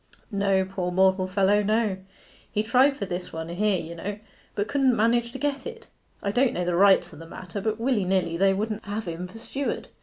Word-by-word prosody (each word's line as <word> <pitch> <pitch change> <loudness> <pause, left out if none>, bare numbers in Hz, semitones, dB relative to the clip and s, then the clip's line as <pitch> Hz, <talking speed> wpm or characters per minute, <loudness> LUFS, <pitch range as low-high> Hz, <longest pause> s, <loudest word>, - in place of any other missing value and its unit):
'No, 195 -2 +2
poor 185 -2 -3
mortal 190 0 +3
fellow, 195 +2 +3
no. 215 -1 +1 0.5
He 210 - 0
tried 260 +5 +4
for 200 - -3
this 180 -1 -5
one 160 0 -5
here, 195 +2 +1
you 165 +1 -7
know, 200 +5 -5 0.4
but 205 - -1
couldn't 270 -3 +2
manage 235 +2 +2
to 265 - -6
get 280 0 -2
it. 460 -1 -9 0.4
I 200 - 0
don't 245 +3 +2
know 180 - -2
the 175 - 0
rights 195 +1 +4
o' - - -11
the 165 +1 -10
matter, 180 +3 -7
but 220 +1 -1
willy 235 -3 +1
nilly 185 -2 0
they 195 +3 +4
wouldn't 215 +1 -3
have 205 0 -4
him 170 +2 -4
for 185 - -12
steward. 270 +4 -4
200 Hz, 215 wpm, -26 LUFS, 185-230 Hz, 0.5 s, tried